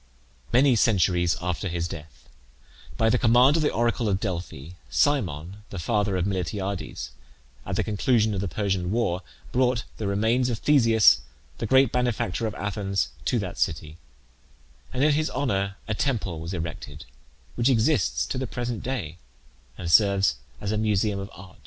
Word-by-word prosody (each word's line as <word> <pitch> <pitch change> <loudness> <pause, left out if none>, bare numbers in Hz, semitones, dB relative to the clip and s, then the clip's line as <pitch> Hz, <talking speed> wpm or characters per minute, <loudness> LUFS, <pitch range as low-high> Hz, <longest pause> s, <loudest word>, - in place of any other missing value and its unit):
Many 130 +1 +5
centuries 90 -6 +2
after 90 +2 -2
his 85 -1 -2
death, 75 -2 -10 0.7
by 110 0 +3
the - - +2
command 125 +4 +5
of - - +1
the 150 - +2
oracle 115 -1 0
of 95 -1 +1
Delphi, 85 -7 -5 0.2
Cimon, 95 - 0
the 100 - -7
father 100 +1 0
of 90 - 0
Miltiades, 95 0 -3 0.6
at - - -2
the - - +1
conclusion 110 +1 +1
of 95 - -2
the 100 - -2
Persian 95 0 -1
war, 95 -5 0 0.3
brought 125 -2 +1
the 105 - -3
remains 110 +5 +1
of 120 - -1
Theseus, 115 -6 +5 0.4
the 115 - -2
great 130 +1 +5
benefactor 120 -4 -1
of 110 - -5
Athens, 100 -1 -2 0.2
to 125 - +1
that 95 -5 -4
city, 80 0 -2 0.9
and 130 +1 0
in 150 - +5
his 155 +2 +1
honour 100 -8 -1
a 105 - -1
temple 105 - -1
was 80 +2 -6
erected, 80 -2 -6 0.5
which 120 +2 +1
exists 110 - +2
to 130 - -3
the 130 - -3
present 120 -2 -4
day, 95 - -4 0.6
and 85 - -5
105 Hz, 145 wpm, -25 LUFS, 90-120 Hz, 0.9 s, Many